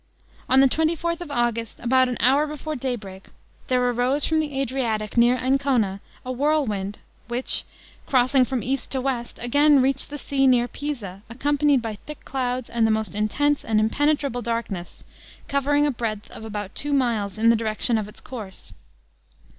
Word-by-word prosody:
On 265 Hz, +1 st, +6 dB
the 270 Hz, -, +7 dB
twenty 320 Hz, +5 st, +1 dB
fourth 335 Hz, +1 st, -2 dB
of 345 Hz, -, -6 dB
August, 235 Hz, -4 st, -1 dB
about 255 Hz, +1 st, +3 dB
an 245 Hz, -, -3 dB
hour 275 Hz, +6 st, +3 dB
before 300 Hz, +1 st, -5 dB
daybreak, 220 Hz, -8 st, -5 dB, 0.4 s
there 250 Hz, -1 st, +2 dB
arose 250 Hz, +4 st, +1 dB
from 320 Hz, -1 st, +2 dB
the 290 Hz, -3 st, -2 dB
Adriatic 230 Hz, -5 st, -1 dB
near 240 Hz, +1 st, +5 dB
Ancona, 255 Hz, -7 st, +1 dB, 0.2 s
a 255 Hz, -, -3 dB
whirlwind, 245 Hz, -8 st, 0 dB, 0.3 s
which 245 Hz, +2 st, -1 dB, 0.4 s
crossing 255 Hz, 0 st, +4 dB
from 250 Hz, -1 st, -2 dB
east 270 Hz, +1 st, -2 dB
to 265 Hz, -, 0 dB
west, 250 Hz, -2 st, -3 dB
again 285 Hz, +4 st, +5 dB
reached 265 Hz, +1 st, +1 dB
the 290 Hz, -, -5 dB
sea 270 Hz, -1 st, +1 dB
near 245 Hz, -2 st, +4 dB
Pisa, 235 Hz, -11 st, -5 dB
accompanied 285 Hz, +1 st, +2 dB
by 220 Hz, -2 st, -4 dB
thick 300 Hz, -1 st, -9 dB
clouds, 255 Hz, -2 st, -2 dB
and 230 Hz, -1 st, +1 dB
the -, -, +1 dB
most 220 Hz, -3 st, 0 dB
intense 275 Hz, +8 st, +1 dB
and 220 Hz, -1 st, +1 dB
impenetrable 280 Hz, +2 st, +1 dB
darkness, 230 Hz, -6 st, -4 dB, 0.4 s
covering 285 Hz, +1 st, +2 dB
a 295 Hz, -, +2 dB
breadth 220 Hz, -4 st, -4 dB
of -, -, -9 dB
about 210 Hz, -3 st, -5 dB
two 290 Hz, 0 st, -2 dB
miles 225 Hz, -8 st, 0 dB
in 230 Hz, +1 st, +5 dB
the -, -, +4 dB
direction 220 Hz, +1 st, 0 dB
of 210 Hz, -, -4 dB
its 210 Hz, -, -11 dB
course. 215 Hz, -7 st, -9 dB
250 Hz, 170 wpm, -24 LUFS, 225-280 Hz, 0.4 s, the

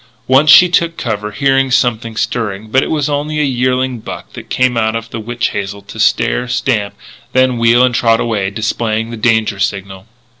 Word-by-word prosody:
Once 135 Hz, +4 st, +4 dB
she 180 Hz, +5 st, +8 dB
took 170 Hz, -1 st, 0 dB
cover, 105 Hz, -3 st, -3 dB
hearing 135 Hz, +4 st, +1 dB
something 115 Hz, -3 st, 0 dB
stirring; 110 Hz, -3 st, -3 dB
but 130 Hz, -, +3 dB
it -, -, -3 dB
was 150 Hz, -3 st, 0 dB
only 150 Hz, +1 st, -2 dB
a -, -, +2 dB
yearling 130 Hz, -1 st, -1 dB
buck -, -, -9 dB
that -, -, -10 dB
came 130 Hz, -1 st, +1 dB
out 110 Hz, -1 st, 0 dB
of 115 Hz, 0 st, -6 dB
the 115 Hz, -, -5 dB
witch 120 Hz, +2 st, -2 dB
hazel 100 Hz, 0 st, -5 dB
to 100 Hz, -, -11 dB
stare, 125 Hz, -, +1 dB
stamp, 110 Hz, -5 st, -1 dB, 0.4 s
then 130 Hz, -2 st, +2 dB
wheel 115 Hz, +2 st, +4 dB
and 125 Hz, -1 st, +2 dB
trot 115 Hz, -1 st, +2 dB
away, 105 Hz, -5 st, -1 dB
displaying 110 Hz, +2 st, -2 dB
the -, -, -5 dB
danger 110 Hz, -3 st, 0 dB
signal. 95 Hz, 0 st, -4 dB
115 Hz, 190 wpm, -14 LUFS, 110-130 Hz, 0.4 s, she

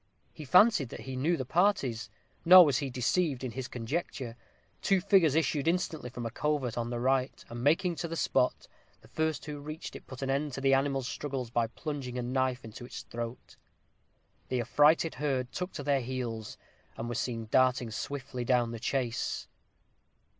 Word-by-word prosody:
He 155 Hz, -, -9 dB
fancied 180 Hz, -, +5 dB
that -, -, -8 dB
he 130 Hz, 0 st, -6 dB
knew 160 Hz, +7 st, +1 dB
the 130 Hz, -, -3 dB
parties; 130 Hz, -, +1 dB, 0.3 s
nor 180 Hz, +1 st, +10 dB
was 145 Hz, -, +2 dB
he 140 Hz, -2 st, -3 dB
deceived 135 Hz, +2 st, 0 dB
in 130 Hz, -, -3 dB
his 130 Hz, +1 st, -5 dB
conjecture. 125 Hz, -1 st, -4 dB, 0.5 s
Two 195 Hz, -1 st, +3 dB
figures 180 Hz, -6 st, +4 dB
issued 155 Hz, -2 st, +1 dB
instantly 165 Hz, -6 st, 0 dB
from 120 Hz, -1 st, -6 dB
a 115 Hz, -, -3 dB
covert 145 Hz, -3 st, -1 dB
on 120 Hz, 0 st, -2 dB
the 120 Hz, -1 st, -3 dB
right, 130 Hz, +1 st, 0 dB
and 120 Hz, +1 st, -6 dB
making 170 Hz, +4 st, +2 dB
to 170 Hz, -, -3 dB
the 165 Hz, -, -4 dB
spot, 125 Hz, -5 st, +1 dB, 0.3 s
the -, -, -18 dB
first 160 Hz, -2 st, -2 dB
who 150 Hz, -1 st, -6 dB
reached 155 Hz, +2 st, -7 dB
it -, -, -10 dB
put 130 Hz, 0 st, -7 dB
an 135 Hz, -, -2 dB
end 140 Hz, +1 st, -1 dB
to 135 Hz, -, -4 dB
the 135 Hz, 0 st, +4 dB
animal's 135 Hz, -1 st, +1 dB
struggles 135 Hz, -6 st, -4 dB
by 120 Hz, -1 st, +1 dB
plunging 135 Hz, -1 st, -5 dB
a 125 Hz, -, -2 dB
knife 130 Hz, 0 st, -1 dB
into 110 Hz, +2 st, -9 dB
its 120 Hz, -, -8 dB
throat. 115 Hz, +1 st, -7 dB, 0.9 s
The 125 Hz, -1 st, 0 dB
affrighted 150 Hz, +7 st, +4 dB
herd 130 Hz, -4 st, -1 dB
took 180 Hz, +4 st, -4 dB
to 145 Hz, -, -5 dB
their 140 Hz, -1 st, +2 dB
heels, 120 Hz, -3 st, -4 dB, 0.4 s
and 115 Hz, -, -4 dB
were 120 Hz, -, -3 dB
seen 115 Hz, -1 st, -2 dB
darting 130 Hz, -2 st, +3 dB
swiftly 130 Hz, +1 st, -4 dB
down 120 Hz, -1 st, +2 dB
the 115 Hz, -, -6 dB
chase. 125 Hz, -1 st, -2 dB
130 Hz, 185 wpm, -30 LUFS, 120-150 Hz, 0.9 s, nor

